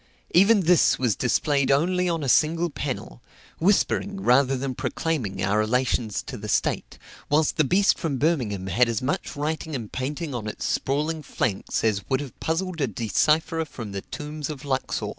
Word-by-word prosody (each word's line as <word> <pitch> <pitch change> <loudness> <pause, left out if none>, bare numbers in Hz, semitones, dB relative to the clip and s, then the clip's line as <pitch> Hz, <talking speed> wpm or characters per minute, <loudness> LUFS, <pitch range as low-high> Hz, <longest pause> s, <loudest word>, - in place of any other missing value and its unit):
Even 200 +4 +6
this 175 -1 +4
was 125 -5 +1
displayed 140 +3 +1
only 180 +6 +2
on 165 -3 -1
a - - -2
single 165 +5 +3
panel, 130 - -5 0.4
whispering, 200 +2 +1
rather 135 -4 +3
than 130 0 -3
proclaiming, 120 - -2
our 100 +3 +2
relations 115 -1 0
to 125 - -7
the 105 0 -7
state; - - -1 0.3
whilst 150 +1 +2
the 155 - +4
beast 190 +8 +3
from 155 -6 -2
Birmingham 125 - 0
had 120 +7 +2
as 115 +1 -2
much 140 - -2
writing 155 +1 -3
and 115 -5 -6
painting 145 +4 -4
on 115 -3 -4
its 105 - -5
sprawling 155 +4 -1
flanks 115 -8 -2
as 105 -3 +1
would 130 - +2
have 145 -4 -8
puzzled 165 0 -2
a 135 - +2
decipherer 155 - +1
from 120 -8 -8
the 100 0 -4
tombs 150 +4 -6
of 150 -1 -7
Luxor. 135 -2 -1
140 Hz, 175 wpm, -25 LUFS, 120-160 Hz, 0.4 s, Even